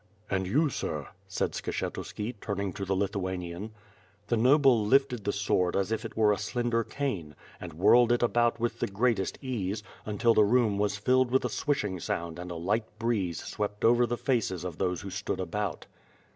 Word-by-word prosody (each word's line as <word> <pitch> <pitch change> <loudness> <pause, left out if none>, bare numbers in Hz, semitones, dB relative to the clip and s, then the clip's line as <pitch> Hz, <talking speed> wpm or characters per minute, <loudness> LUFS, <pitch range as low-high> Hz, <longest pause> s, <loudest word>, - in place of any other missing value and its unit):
"And 95 -1 0
you, 150 - +2
sir," 75 - -4 0.2
said - - -1
Skshetuski, 110 +4 -4
turning 100 -2 -2
to 100 - -4
the 95 +1 0
Lithuanian. 95 0 -3 0.6
The 120 - +3
noble 130 -1 +5
lifted 125 -1 +2
the 100 - +2
sword 95 -3 +1
as 100 +2 0
if 110 - -1
it - - -8
were 110 -1 +5
a 100 - -3
slender 115 +2 0
cane, 100 - -4 0.2
and 85 -3 -8
whirled 120 +7 +5
it 120 0 +2
about 120 0 +2
with 120 0 -1
the - - 0
greatest 105 -1 0
ease, 105 -5 -2 0.2
until 115 +2 +2
the 110 - +5
room 105 -2 +3
was 105 0 0
filled 130 +4 +3
with 130 +2 +2
a - - 0
swishing 105 - -1
sound 85 0 -3
and 90 0 -6
a 85 - -5
light 105 +6 -2
breeze 110 -7 -1
swept 105 0 -3
over 120 +1 +5
the 120 +1 -2
faces 110 -10 0
of 90 -4 -6
those 90 -2 0
who 100 - -7
stood 100 +1 -3
about. 95 +1 -3
105 Hz, 185 wpm, -29 LUFS, 95-120 Hz, 0.6 s, noble